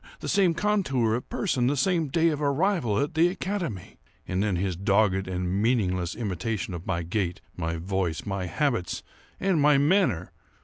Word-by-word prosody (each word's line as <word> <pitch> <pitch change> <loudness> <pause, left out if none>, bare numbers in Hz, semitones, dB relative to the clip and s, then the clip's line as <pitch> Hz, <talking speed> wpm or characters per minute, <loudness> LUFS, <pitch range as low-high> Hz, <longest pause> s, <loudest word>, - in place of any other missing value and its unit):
the - - -6
same 190 -4 +3
contour 150 - +1
of 120 - -3
person! 130 - 0
the 145 +2 +1
same 165 +3 +2
day 165 +4 +2
of 150 -2 -2
arrival 145 - +1
at 145 +3 0
the 165 +2 +4
academy! 175 - -4 0.3
And 95 +1 -1
then 100 -3 +1
his 90 0 -1
dogged 95 0 +2
and 90 +1 -1
meaningless 95 -7 +1
imitation 105 -2 -3
of 85 0 -7
my 85 -3 -1
gait, 90 0 -2 0.2
my 85 -1 -2
voice, 90 -1 -2
my 95 -2 -3
habits, 115 - -1 0.4
and 185 -5 +2
my 145 -1 +5
manner! 145 - +2
110 Hz, 170 wpm, -26 LUFS, -, 0.4 s, my